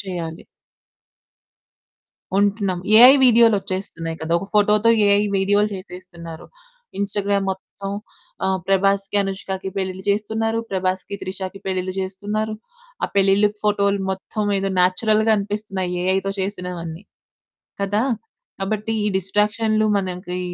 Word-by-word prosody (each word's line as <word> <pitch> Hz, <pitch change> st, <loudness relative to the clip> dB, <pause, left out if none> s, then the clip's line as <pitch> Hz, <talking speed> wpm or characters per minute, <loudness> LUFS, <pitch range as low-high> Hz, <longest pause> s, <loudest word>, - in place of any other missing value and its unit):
చేయాలి. 170 Hz, -4 st, -6 dB, 1.9 s
ఉంటున్నాం. 200 Hz, -3 st, +1 dB, 0.2 s
ఏఐ 250 Hz, +4 st, +10 dB
వీడియోలు 230 Hz, -2 st, +6 dB
ఒచ్చేస్తున్నాయి 185 Hz, -4 st, -5 dB
కదా! 160 Hz, +1 st, -4 dB
ఒక 195 Hz, -, -7 dB
ఫోటోతో 210 Hz, +2 st, +4 dB, 0.2 s
ఏఐ 200 Hz, 0 st, +4 dB, 0.2 s
వీడియోలు 205 Hz, +2 st, +2 dB
చేసేస్తున్నారు. 175 Hz, -3 st, -10 dB, 0.5 s
ఇన్‌స్టాగ్రామ్ 200 Hz, -1 st, +1 dB
మొత్తం 195 Hz, +1 st, -7 dB, 0.5 s
ఆ! -, -, +2 dB, 0.2 s
ప్రభాస్‌కి, 195 Hz, +1 st, +2 dB
అనుష్కకి 190 Hz, 0 st, -4 dB
పెళ్ళిళ్ళు 190 Hz, 0 st, -3 dB
చేస్తున్నారు. 220 Hz, +2 st, 0 dB
ప్రభాస్‌కి, 185 Hz, +1 st, -2 dB
త్రిషకి 190 Hz, +1 st, -6 dB
పెళ్ళిళ్ళు 185 Hz, -1 st, -2 dB
చేస్తున్నారు. 205 Hz, +3 st, -3 dB, 0.5 s
ఆ -, -, +5 dB
పెళ్ళిళ్ళు, 195 Hz, +1 st, +4 dB
ఫోటోలు 200 Hz, -1 st, +2 dB
మొత్తం 205 Hz, +2 st, -4 dB
ఏదో 195 Hz, 0 st, -1 dB
న్యాచురల్‌గా 215 Hz, +4 st, +3 dB
అనిపిస్తున్నాయి 200 Hz, -3 st, -3 dB
ఏఐతో 190 Hz, +1 st, +1 dB
చేసినవన్నీ. 180 Hz, -3 st, -4 dB, 0.8 s
కదా! 205 Hz, +3 st, +1 dB, 0.6 s
కాబట్టి 215 Hz, +3 st, -2 dB
ఈ -, -, 0 dB
డిస్ట్రాక్షన్లు 210 Hz, +3 st, +1 dB
మనకి 180 Hz, -1 st, -3 dB
195 Hz, 105 wpm, -21 LUFS, 185-210 Hz, 1.9 s, ఏఐ